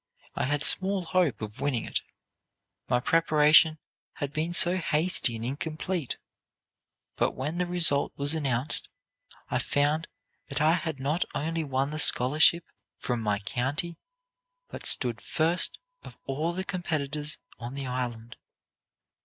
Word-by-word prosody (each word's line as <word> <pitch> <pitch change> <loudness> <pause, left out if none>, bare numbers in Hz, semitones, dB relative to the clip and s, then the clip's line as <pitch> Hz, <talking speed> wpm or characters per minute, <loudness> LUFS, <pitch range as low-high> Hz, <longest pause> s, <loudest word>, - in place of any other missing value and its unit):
I - - -1
had 145 +2 -1
small 190 +1 +3
hope 170 -9 0
of 110 +5 -7
winning 140 -5 -1
it, - - -2 0.9
my 125 -1 +3
preparation 155 +2 +4 0.4
had 145 0 -5
been 160 +3 -1
so 175 +1 +5
hasty 165 -6 0
and 115 +1 -5
incomplete. 155 +3 -3 1.0
But - - +1
when 150 +6 -3
the 180 - 0
result 170 -5 +3
was 145 +2 +1
announced, 135 -4 -1 0.6
I - - +1
found 150 +3 0 0.4
that 140 - -3
I 155 +2 +4
had 160 -4 -3
not 145 +6 0
only 165 +2 -2
won 135 0 -1
the 155 - -4
scholarship 155 +5 +5 0.3
from 120 -2 -3
my 105 -2 0
county, 135 - -3 0.7
but - - -3
stood 120 -3 +4
first 165 +2 +1 0.2
of - - -13
all 150 +5 -2
the 185 +2 -4
competitors 155 -5 -3 0.2
on 120 +3 -7
the 140 -1 -4
Island. 120 -2 -5
150 Hz, 135 wpm, -27 LUFS, 130-165 Hz, 1.0 s, so